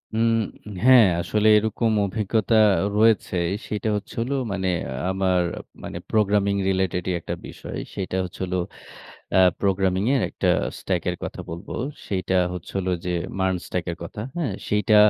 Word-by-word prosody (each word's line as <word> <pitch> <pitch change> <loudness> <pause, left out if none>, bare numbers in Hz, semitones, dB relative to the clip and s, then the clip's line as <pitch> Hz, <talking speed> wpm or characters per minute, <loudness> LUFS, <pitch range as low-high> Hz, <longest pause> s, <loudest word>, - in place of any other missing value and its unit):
উম 115 +1 +3 0.6
হ্যাঁ, 130 -3 +8 0.2
আসলে 105 +4 +1
এরকম 110 +2 +1
অভিজ্ঞতা 110 +2 0 0.4
রয়েছে 110 -3 +3 0.3
সেটা 105 +1 -2
হচ্ছে 105 - -6
হলো 130 +4 -1 0.2
মানে 95 -1 -1 0.4
আমার 95 -1 +2 0.4
মানে - - -5
প্রোগ্রামিং 100 -2 +2
রিলেটেডই 95 -1 0
একটা - - -4
বিষয়। - - -8 0.2
সেটা 95 -1 -2
হচ্ছে 90 - -8
হল 90 - -5 0.8
অ্যা 95 - +6 0.2
প্রোগ্রামিং 95 -1 +1
এর 130 - +2
একটা - - 0 0.3
স্ট্যাক 90 -3 -1
এর - - -4
কথা - - -5
বলব। 85 +4 -7 0.4
সেইটা 95 -1 -1 0.2
হচ্ছে 90 -2 -7
হল 95 - -4 0.2
যে 90 - -1 0.3
MERN 95 0 +2
স্ট্যাক 90 -2 -2
এর 85 - -7
কথা। 85 +5 -7 0.2
হ্যাঁ? 145 - -1 0.2
সেইটা 105 +1 +3
100 Hz, 145 wpm, -24 LUFS, 95-110 Hz, 0.8 s, হ্যাঁ